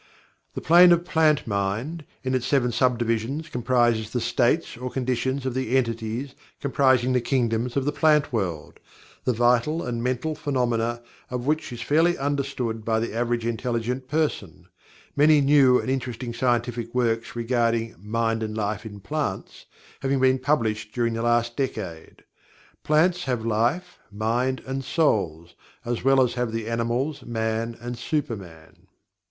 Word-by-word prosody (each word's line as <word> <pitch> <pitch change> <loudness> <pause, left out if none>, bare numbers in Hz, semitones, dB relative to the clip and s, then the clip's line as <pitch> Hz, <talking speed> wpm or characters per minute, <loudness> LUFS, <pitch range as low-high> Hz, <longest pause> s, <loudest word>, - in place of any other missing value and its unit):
The - - -4
Plane 175 +2 +7
of 170 0 0
Plant 155 -3 +2
Mind, 110 +10 -2 0.2
in 130 0 -1
its 130 -2 0
seven 125 -4 +2
sub 125 +1 +2
divisions, 120 +7 -2
comprises 120 -3 +1
the 125 - -2
states 130 +8 +1
or 125 +2 -5
conditions 130 +1 -2
of 130 - -1
the 130 0 0
entities 115 +2 -2 0.3
comprising 130 -3 +2
the 125 - +2
kingdoms 120 -1 0
of 135 - 0
the 145 - +1
Plant 150 -1 +2
World, 90 -9 -3 0.5
the 125 - +2
vital 120 +7 +2
and 120 -1 -3
mental 130 +5 -1
phenomena 120 -5 -1 0.3
of 125 0 -4
which 155 -1 -1
is 120 -1 -6
fairly 160 +7 +3
well 175 - -8
understood 135 -6 -2
by 110 0 +1
the 115 -1 -3
average 120 0 -1
intelligent 120 +2 -2
person, 145 - -2 0.5
many 150 +1 +5
new 140 -3 +5
and - - -5
interesting 125 -2 -3
scientific 120 -1 -1
works 115 -2 0
regarding 115 -1 0
"Mind 115 +2 -1
and 110 0 -4
Life 105 +1 -2
in 105 -2 -10
Plants" 140 -2 -4 0.3
having 135 0 0
been 130 0 +3
published 110 -6 -1
during 120 -2 +1
the 115 - -3
last 120 0 +1
decade. 105 - -5 0.6
Plants 170 +4 +2
have 125 -4 -2
life, 120 +12 0
mind 120 +5 -1
and 135 +1 -3
"souls," 90 - 0 0.3
as 120 0 -2
well 135 0 +5
as 125 - 0
have 125 -2 -2
the 115 -1 -4
animals, 120 +5 -1
man, 115 0 -2
and 120 +1 -5
super 145 -3 -1
man. 80 -5 -14
120 Hz, 155 wpm, -24 LUFS, 115-135 Hz, 0.6 s, Plane